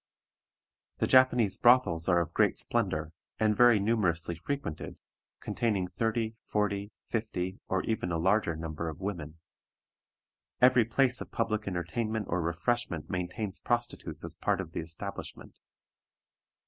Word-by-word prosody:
The - - +1
Japanese 125 -5 +4
brothels 100 -9 +4
are 90 -2 +4
of 85 0 -5
great - - +3
splendor, 80 +1 +1 0.3
and 110 -1 +3
very 120 -1 +6
numerously 95 -6 +1
frequented, 85 - -5 0.4
containing 105 -6 -1
thirty, 110 +3 -1
forty, 105 0 -1
fifty, 95 -5 -3
or 95 - 0
even 110 -5 -2
a 85 - 0
larger 95 0 +2
number 80 0 -4
of 80 - -8
women. 85 -6 -5 1.2
Every 125 -2 +6
place 125 +2 +2
of - - -7
public 110 -2 -1
entertainment 105 +5 -2
or 90 +1 0
refreshment 85 +1 -2
maintains 90 +3 -3
prostitutes 120 0 -3
as - - -3
a - - -20
part - - +2
of - - -5
the - - -4
establishment. 85 +5 -5
100 Hz, 135 wpm, -30 LUFS, 85-115 Hz, 1.2 s, very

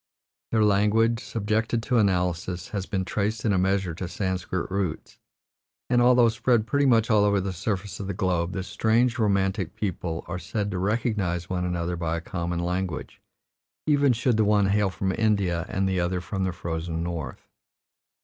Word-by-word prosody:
Their 110 -2 +3
language, 105 +3 +3
subjected 110 +1 -1
to 125 -1 +2
analysis, 90 -2 0
has 100 -5 -4
been 95 -3 -1
traced 105 +3 -2
in 105 - +3
a 95 - +2
measure 95 -1 +1
to 90 +3 -5
Sanscrit 90 -1 -3
roots, 95 -5 -3 0.7
and 120 -1 +4
although 125 -1 +6
spread 115 0 +1
pretty 140 +5 +2
much 115 -2 +3
all 105 -2 +5
over 100 -1 +3
the 95 0 -3
surface 100 +2 -3
of 100 - -5
the 100 - -2
globe, 90 -1 0
this 95 0 -4
strange, 120 +4 +2
romantic 95 -3 0
people 85 -4 -3
are 90 0 -4
said 105 +1 -3
to 90 - -2
recognize 95 -4 -1
one 90 -1 -1
another 90 0 -2
by 85 -1 -2
a - - -5
common 85 0 -3
language, 90 -2 -3 0.6
even 145 -3 +4
should 120 0 +1
the 110 - +4
one 105 -1 +3
hail 105 0 +2
from 95 +2 -2
India 95 -5 +1
and 95 0 0
the 95 -1 0
other 90 +1 0
from 95 +1 -3
the 95 - 0
frozen 80 -1 -4
North. 80 -7 -5
95 Hz, 180 wpm, -26 LUFS, 90-110 Hz, 0.7 s, although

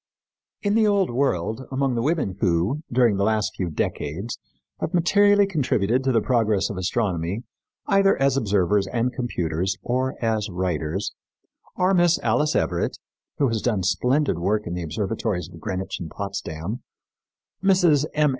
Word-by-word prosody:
In 205 -1 +1
the 220 -1 +4
Old 200 -6 +2
World 120 -2 -1
among 135 -1 0
the 115 - 0
women 140 - 0
who, 95 - +1
during 120 -4 +3
the 100 - +1
last 110 0 +1
few 90 -3 -2
decades, 85 +7 -3 0.4
have 165 - -2
materially 205 +4 +4
contributed 130 - +1
to 130 - +2
the 115 -3 +3
progress 110 -6 +1
of 100 - -6
astronomy, 95 0 -1 0.4
either 195 -1 +3
as 135 0 +3
observers 100 -4 +2
and 120 +5 -1
computers 95 -6 -2
or 130 +2 -1
as 110 -2 0
writers, 90 0 -2 0.6
are 185 +1 +2
Miss 175 -2 +4
Alice 125 +7 +2
Everett, - - 0 0.4
who 140 - +3
has 115 -2 -1
done 105 -6 0
splendid 125 - +1
work 105 +4 0
in 85 - -4
the 90 - -3
observatories 95 +1 -2
of 85 - -11
Greenwich 95 -2 -4
and 85 - -6
Potsdam, 100 +2 -5 0.8
Misses 175 -7 +4
M. 150 -1 +4
110 Hz, 155 wpm, -24 LUFS, 95-140 Hz, 0.8 s, the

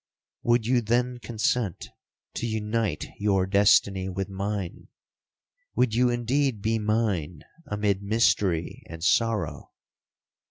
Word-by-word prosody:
—'Would 120 -1 +2
you 125 +1 +3
then 120 +2 0
consent 110 -3 -1 0.4
to 120 - -3
unite 110 -5 -1
your 100 -2 +2
destiny 100 -1 +3
with 95 +1 -4
mine? 100 -1 -4 0.9
Would 125 -3 +2
you 125 +2 +3
indeed 120 +1 0
be 110 +2 0
mine 105 -8 -1 0.2
amid 105 -1 0
mystery 100 -5 +1
and 80 0 -9
sorrow? 115 +3 0
105 Hz, 110 wpm, -26 LUFS, 95-115 Hz, 0.9 s, you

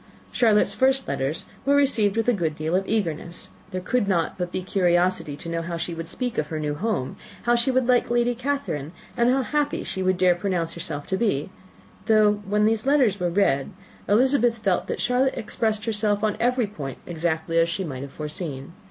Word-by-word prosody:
Charlotte's 220 -4 +3
first 265 0 +2
letters 135 +4 -2 0.2
were 280 +1 +3
received 230 -8 +3
with 225 - 0
a 245 - +4
good 165 -7 -1
deal 155 +3 -1
of 190 - +2
eagerness: 170 -5 -2 0.2
there 185 -1 -3
could 205 +4 0
not 170 -4 0
but 180 -1 -4
be 185 - -3
curiosity 180 -4 +1
to 170 - -9
know 165 0 -2
how 170 0 -4
she 170 +1 -4
would 165 0 -6
speak 245 +6 -2
of 150 - -1
her 155 0 -4
new 150 -1 -2
home, 165 - -2 0.3
how 240 - +3
she 235 +2 +1
would 260 -1 +2
like 250 -1 +3
Lady 240 0 +2
Catherine, 245 - -3 0.2
and 235 +1 +3
how 265 +1 +2
happy 295 +2 -1
she 190 - -3
would 185 0 +1
dare 185 -1 +4
pronounce 175 -2 -2
herself 160 -4 -5
to 190 - -1
be; 190 -8 0 0.6
though, 210 -2 +4
when 210 +1 +2
the 220 +1 +4
letters 260 -8 +3
were 175 -1 0
read, 170 -7 +1 0.4
Elizabeth 240 +1 +3
felt 195 -4 0
that - - -3
Charlotte 255 +2 +1
expressed 215 0 -1
herself 210 -1 0
on 215 -1 +1
every 245 0 +2
point 145 -11 -7
exactly 165 -1 -1
as 165 0 +3
she 190 +3 -2
might 135 -7 -5
have 140 0 -7
foreseen. 150 -2 -5
195 Hz, 205 wpm, -24 LUFS, 165-235 Hz, 0.6 s, a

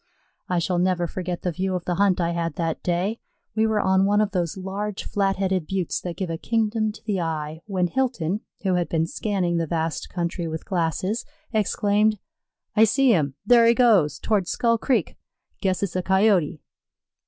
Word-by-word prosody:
I 180 - +1
shall 175 +1 0
never 180 -1 +1
forget 180 0 -4
the 180 - 0
view 185 +2 -2
of 180 - -4
the 180 - 0
hunt 190 0 +2
I 170 -1 +1
had 170 -2 -2
that 165 -2 -2
day. 185 +6 -1 0.4
We 220 0 +3
were 220 -1 +1
on 190 -1 +3
one 205 +1 +3
of 210 -1 +1
those 175 -2 -1
large, 195 +2 -4
flat 195 -1 0
headed 185 -4 -1
buttes 190 -3 -2
that 175 -2 -5
give 185 -4 -3
a 165 - -4
kingdom 220 -1 0
to 215 - -15
the 200 -4 -1
eye, 160 -1 -3
when 185 -3 0
Hilton, 215 -4 -1 0.2
who 190 -2 +1
had 175 -1 0
been 160 -1 +1
scanning 180 -1 -1
the 165 -1 -1
vast 160 -1 -2
country 170 -1 -3
with 160 0 -5
glasses, 185 +4 -1 0.3
exclaimed: 210 0 +2 0.6
"I 220 - +6
see 260 +4 +4
him. 140 -7 0
There 235 +1 +6
he 235 - +5
goes, 210 - +4
toward 200 -5 0
Skull 230 +2 +1
Creek. 260 +1 0 0.4
Guess 190 -1 0
it's 190 -3 -2
a 185 - +1
Coyote." 190 -6 +2
185 Hz, 190 wpm, -24 LUFS, 170-210 Hz, 0.6 s, I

